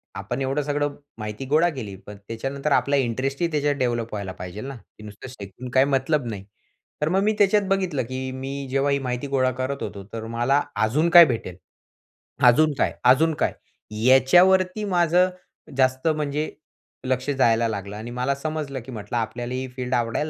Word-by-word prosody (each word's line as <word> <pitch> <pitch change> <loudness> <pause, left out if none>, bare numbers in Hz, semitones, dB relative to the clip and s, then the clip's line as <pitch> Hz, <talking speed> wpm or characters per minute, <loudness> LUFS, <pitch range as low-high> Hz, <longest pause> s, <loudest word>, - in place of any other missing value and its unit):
आपण 125 +3 -4
एवढं 135 +2 0
सगळं 145 0 -1 0.2
माहिती 105 +4 -6
गोळा 155 +5 +3
केली 110 - -6
पण 105 0 -10
त्याच्यानंतर 135 +6 -3
आपला 140 +1 +3
इंटरेस्ट 135 +3 -1
ही 170 - +3
त्याच्यात 145 -1 +1
डेव्हलप 120 -4 -1
व्हायला 100 -2 -4
पाहिजे 90 +4 -8
ना? 135 0 -6
ते 105 -2 -17
नुसतं 105 +4 -10
शिकून 125 +1 -9
काही 130 +1 +4
मतलब 140 0 +1
नाही. 100 -3 -6 0.6
तर 150 - +1
मग 190 +3 +2
मी 215 +1 +2
त्याच्यात 205 0 +4
बघितलं, 185 -9 0
की 130 +2 -5
मी 135 +1 -5
जेव्हा 135 +1 +1
ही 140 - +2
माहिती 125 +1 -3
गोळा 130 -2 +1
करत 130 +2 -4
होतो 100 -1 -6
तर 110 -1 -5
मला 135 +5 +2 0.2
अजून 150 +10 +2
काय 170 -1 +10
भेटेल? 115 -9 -3 0.9
अजून 150 +5 +5
काय? - - +1
अजून 160 +5 +5
काय? - - 0 0.5
याच्यावरती 185 +10 +5
माझं 180 -1 +3 0.5
जास्त 130 +3 +2
म्हणजे 150 -1 -1 0.6
लक्ष 130 +2 -1
जायला 115 -4 +3
लागलं 100 -1 -5
आणि 115 +2 -7
मला 125 +3 -1
समजलं, 150 -2 -4
की 130 - -11
म्हटलं 110 +1 -5
आपल्याला 120 +2 -3
ही 130 +1 -3
फील्ड 125 0 -3
आवडायला 120 +6 -1
130 Hz, 175 wpm, -24 LUFS, 120-150 Hz, 0.9 s, काय